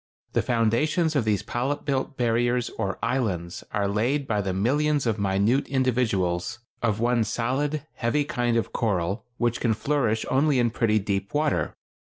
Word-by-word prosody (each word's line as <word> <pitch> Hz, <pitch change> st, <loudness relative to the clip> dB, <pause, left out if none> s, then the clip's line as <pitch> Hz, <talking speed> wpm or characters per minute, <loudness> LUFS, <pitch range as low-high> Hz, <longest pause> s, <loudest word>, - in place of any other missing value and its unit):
The -, -, +3 dB
foundations 130 Hz, +8 st, +1 dB
of 130 Hz, -6 st, +2 dB
these 105 Hz, -3 st, +1 dB
polyp 135 Hz, +4 st, -2 dB
built 135 Hz, 0 st, -1 dB
barriers 120 Hz, 0 st, +1 dB
or 100 Hz, 0 st, -3 dB
islands 105 Hz, -9 st, -1 dB
are 100 Hz, -1 st, 0 dB
laid 120 Hz, +8 st, 0 dB
by 105 Hz, -5 st, 0 dB
the 95 Hz, -1 st, -2 dB
millions 140 Hz, +9 st, +1 dB
of 110 Hz, -2 st, 0 dB
minute 100 Hz, +7 st, +2 dB
individuals 120 Hz, -7 st, 0 dB, 0.2 s
of 110 Hz, -3 st, +1 dB
one 120 Hz, 0 st, +2 dB
solid, 130 Hz, +7 st, -1 dB
heavy 120 Hz, +5 st, 0 dB
kind 120 Hz, -6 st, 0 dB
of 115 Hz, -, -2 dB
coral 100 Hz, +1 st, -1 dB
which 120 Hz, 0 st, 0 dB
can 115 Hz, -3 st, +2 dB
flourish 120 Hz, -4 st, 0 dB
only 140 Hz, +1 st, +3 dB
in 120 Hz, -2 st, +2 dB
pretty 110 Hz, -2 st, +2 dB
deep 100 Hz, +2 st, -2 dB
water. 150 Hz, 0 st, 0 dB
120 Hz, 160 wpm, -25 LUFS, 105-135 Hz, 0.2 s, The